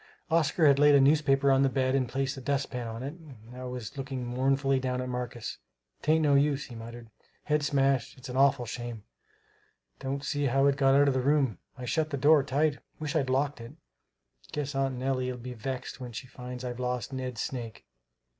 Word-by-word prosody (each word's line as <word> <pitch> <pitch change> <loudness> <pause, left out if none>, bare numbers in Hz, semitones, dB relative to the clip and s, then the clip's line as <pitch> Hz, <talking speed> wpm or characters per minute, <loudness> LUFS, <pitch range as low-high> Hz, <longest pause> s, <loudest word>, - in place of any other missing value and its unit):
Oscar 160 0 +3
had 140 -1 +6
laid 145 0 +7
a - - +7
newspaper 140 -1 +4
on 135 0 +4
the 135 - +4
bed 130 -1 +1
and 130 -3 +1
placed 135 +1 -1
the 135 - -8
dustpan 135 -3 -2
on 115 +2 -6
it 140 +2 -4
and 160 -7 -14 0.2
now 125 0 -7
was 125 +1 -6
looking 130 -2 -4
mournfully 135 +2 +1
down 130 -1 -2
at 125 - -3
Marcus. 125 -2 -5 0.4
"'Tain't 155 +1 +3
no 145 -2 +4
use," 140 0 +2
he 125 - -11
muttered, 115 0 -9 0.3
"head's 150 -1 +1
smashed. 135 -2 +1
It's 130 - -10
an 125 - -6
awful 135 -1 +4
shame! 120 -2 -6 1.0
Don't 140 +1 -3
see 145 -1 -1
how 135 +1 +3
it 140 -1 +4
got 135 -1 +4
out 145 +1 +5
of 140 - +3
the 130 - +1
room 135 - +2 0.2
I 125 - -6
shut 155 +4 0
the 140 - -2
door 150 +2 +6
tight. 145 +2 0 0.2
Wish 155 +1 -3
I'd 140 -4 +1
locked 140 0 0
it! 115 - -9 0.8
Guess 145 -2 -3
Aunt 135 -1 0
Nellie'll 130 -1 -1
be 125 +1 -7
vexed 130 +2 -5
when 125 -2 -7
she 120 - -6
finds 125 0 -8
I've 125 0 -5
lost 125 +1 -2
Ned's 130 -3 -3
snake. 120 -4 -6
135 Hz, 205 wpm, -29 LUFS, 125-140 Hz, 1.0 s, laid